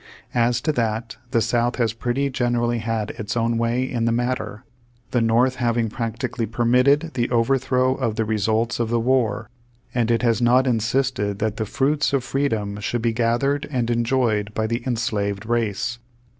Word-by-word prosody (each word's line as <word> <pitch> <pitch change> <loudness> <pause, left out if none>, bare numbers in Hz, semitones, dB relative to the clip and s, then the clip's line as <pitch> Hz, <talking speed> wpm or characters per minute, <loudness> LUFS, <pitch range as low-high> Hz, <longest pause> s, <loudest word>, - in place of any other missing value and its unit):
As 120 0 +2
to 155 - +1
that, 115 -3 -2
the 115 - +2
South 120 +2 +1
has 115 -4 0
pretty 125 +4 -1
generally 120 -2 0
had 110 -1 -2
its 110 +2 -3
own 115 0 +1
way 115 +2 +1
in 120 -3 -2
the 115 - +2
matter, 120 -1 -2 0.5
the 120 - +2
North 120 +3 +2
having 120 -2 +1
prac 115 0 -4
tically 120 -2 -3
permitted 125 +7 +3
the 120 -2 0
overthrow 130 +1 +2
of 120 -5 -2
the 110 - 0
results 110 +2 0
of 115 -1 0
the 120 0 +1
war, 115 -4 +1 0.5
and 120 -2 +1
it 115 +1 +2
has 115 -1 +2
not 125 +2 +4
insisted 115 -3 0
that 110 0 -2
the 110 - -2
fruits 140 +6 +1
of 135 -3 +1
freedom 110 -8 -1
should 115 +3 -2
be 115 -1 +1
gathered 120 +5 0
and 120 -4 -1
enjoyed 115 -3 +1
by 110 - 0
the 115 +2 -1
enslaved 105 -4 -1
race. 115 0 -1
120 Hz, 175 wpm, -22 LUFS, 110-125 Hz, 0.5 s, not